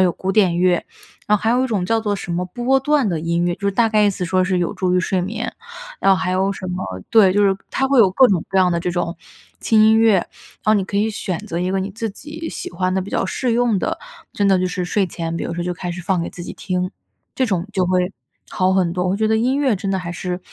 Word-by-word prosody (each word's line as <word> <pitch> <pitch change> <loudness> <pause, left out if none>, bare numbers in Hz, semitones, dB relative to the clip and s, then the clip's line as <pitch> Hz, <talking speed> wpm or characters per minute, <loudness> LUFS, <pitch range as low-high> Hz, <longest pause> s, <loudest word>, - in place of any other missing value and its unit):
有 180 -2 +3
古 190 - -3
典 185 -5 +3
乐， 180 -1 +2 0.4
然 210 - +4
后 - - -8
还 225 - +2
有 250 +2 +2
一 - - 0
种 200 -5 -1
叫 225 +2 +2
做 210 -2 -1
什 175 - -5
么 180 +1 -1
波 245 +7 +1
段 285 -5 +2
的 170 -3 -1
音 170 +1 0
乐， 175 - 0
就 - - -26
是 - - -1
大 225 +3 +3
概 215 -1 +3
意 205 - +4
思 180 -1 -4
说 185 +1 +1
是 185 -1 0
有 175 - -1
助 180 -1 0
于 180 - +3
睡 185 0 0
眠。 215 +6 -4 0.5
然 195 - +5
后 - - +3
还 185 0 -2
有 190 +2 +1
什 185 - -7
么 180 +1 -3 0.3
对， 200 -5 +6
就 205 +1 +3
是 195 -1 +3 0.2
它 270 - +1
会 270 -2 +3
有 200 - +6
各 255 +6 +6
种 180 -5 +1
各 195 - -2
样 180 -1 +4
的 170 - 0
这 175 - -2
种 175 -1 -2 0.4
轻 220 -1 +3
音 220 +1 +5
乐， 225 -3 +5
然 - - 0 0.4
后 215 +1 +4
你 195 -2 +1
可 200 - -4
以 215 +2 +2
选 185 -4 -3
择 185 -6 -5
一 180 +1 -1
个 195 0 0
你 190 - -3
自 225 +1 -4
己 310 +9 -8
喜 360 - -6
欢 185 0 -1
的 190 - +1
比 200 - -9
较 - - 0
适 240 +5 -1
用 235 -4 +2
的， - - -2 0.3
真 205 - 0
的 190 -1 +4
就 185 - 0
是 180 0 -3
睡 195 +2 0
前， 165 -1 -5
比 - - -3
如 170 - -4
说 175 - -3
就 180 - -1
开 175 +1 -5
始 175 0 -6
放 180 0 0
给 - - -4
自 175 - -9
己 - - -6
听， 180 0 -3 0.4
这 260 - +1
种 185 -3 -1
就 185 -2 +1
会 180 +1 +1 0.4
好 185 0 +1
很 180 -3 +2
多， 180 0 -1
我 180 - +1
会 195 - 0
觉 220 - +1
得 220 - +3
音 255 +4 +1
乐 265 -6 +2
真 195 +1 -3
的 190 - 0
还 175 -1 -5
是 180 0 -4
190 Hz, 315 characters per minute, -20 LUFS, 180-220 Hz, 0.5 s, 对